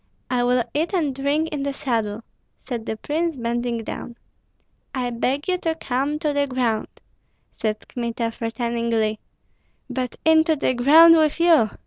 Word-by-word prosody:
I 245 -1 +2
will 245 0 +2
eat 320 +6 -1
and 305 -6 0
drink 285 +4 0
in 295 -2 -3
the 280 0 -2
saddle," 225 -5 -2 0.4
said 235 -4 -4
the 220 - -3
prince, 320 +5 -2
bending 235 -1 -2
down. 235 +1 -7 0.8
"I 250 -2 -1
beg 265 +6 -1
you 365 -1 0
to 325 -2 -1
come 275 0 -1
to 300 -2 -1
the 285 0 +1
ground!" 245 -4 -1 0.7
said 215 -1 -3
Kmita, 235 -1 -3
threateningly. 230 -1 -1 0.7
"But 250 -1 -3
into 320 0 +5
the 275 -3 0
ground 315 +7 +7
with 310 0 +2
you!" 330 -10 +5
255 Hz, 150 wpm, -22 LUFS, 235-300 Hz, 0.8 s, ground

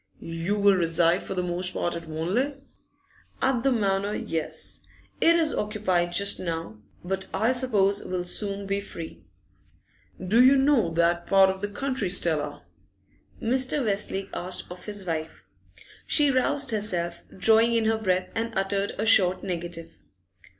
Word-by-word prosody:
'You 165 +5 -3
will 200 -1 +5
reside 170 0 +3
for 195 - -6
the 180 - -1
most 180 +1 -2
part 175 - -1
at 170 -1 -7
Wanley?' 185 - -1 0.8
'At 265 -3 +1
the 270 - +2
Manor, 200 -3 0
yes. 160 -2 -1 0.4
It 335 - +5
is 320 -2 +2
occupied 190 -5 -1
just 200 +3 +2
now, 165 -11 -5 0.2
but 190 +1 -3
I 220 +5 +1
suppose 210 -6 +2
will 180 -1 -3
soon 200 +2 -3
be 200 +1 -1
free.' 165 -5 -9 1.0
'Do 215 +7 +4
you 265 +2 +6
know 265 - +3
that 170 +1 +1
part 195 -1 +5
of 190 0 -8
the 205 - -1
country, 255 -1 -2
Stella?' 150 -5 0 0.8
Mr. 260 +3 0
Westlake 195 -1 -1
asked 180 0 -4
of 180 0 -10
his 205 -2 -4
wife. 160 - -4 0.6
She 290 -2 +4
roused 275 +1 0
herself, 175 -6 -2 0.2
drawing 225 +3 +4
in 225 -1 +1
her 220 0 +1
breath, 185 -3 -1
and 230 -1 -3
uttered 195 +1 -1
a 215 - -1
short 185 -5 +4
negative. 170 -2 -6
195 Hz, 150 wpm, -26 LUFS, 175-225 Hz, 1.0 s, you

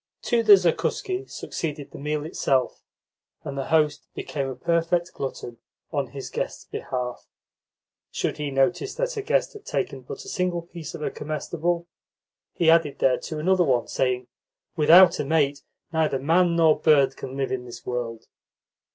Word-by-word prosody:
To 235 -1 +2
the 215 -2 +8
zakuski 370 - -1
succeeded 150 -3 -5
the - - -10
meal 150 +1 -2
itself, 135 -4 0 0.6
and 140 - -5
the 135 -1 -3
host 150 -2 +1
became 140 -2 -3
a 130 - -5
perfect 170 +2 0
glutton 120 -3 -6 0.3
on - - -1
his - - -8
guests' - - -4
behalf. 125 -1 -5 0.8
Should - - -2
he 150 -1 -3
notice 175 - +1
that - - -2
a 425 - -2
guest - - 0
had 420 -1 -11
taken - - -3
but 435 0 -8
a - - -11
single 180 - -1
piece 170 -2 -8
of 155 - -6
a - - -1
comestible, 170 +3 -2 0.7
he 170 - 0
added 160 -4 +3
thereto 135 +4 0
another 180 +4 +3
one, 125 -6 +1
saying: 125 -1 0 0.5
"Without 170 +3 +7
a - - +1
mate, 145 -1 +1 0.3
neither 160 -4 +1
man 170 +5 +3
nor 160 -2 +4
bird 140 -4 +4
can 130 +1 -7
live 135 -1 -1
in 125 -1 -3
this 120 - -10
world." 120 -2 -4
155 Hz, 160 wpm, -25 LUFS, 135-175 Hz, 0.8 s, the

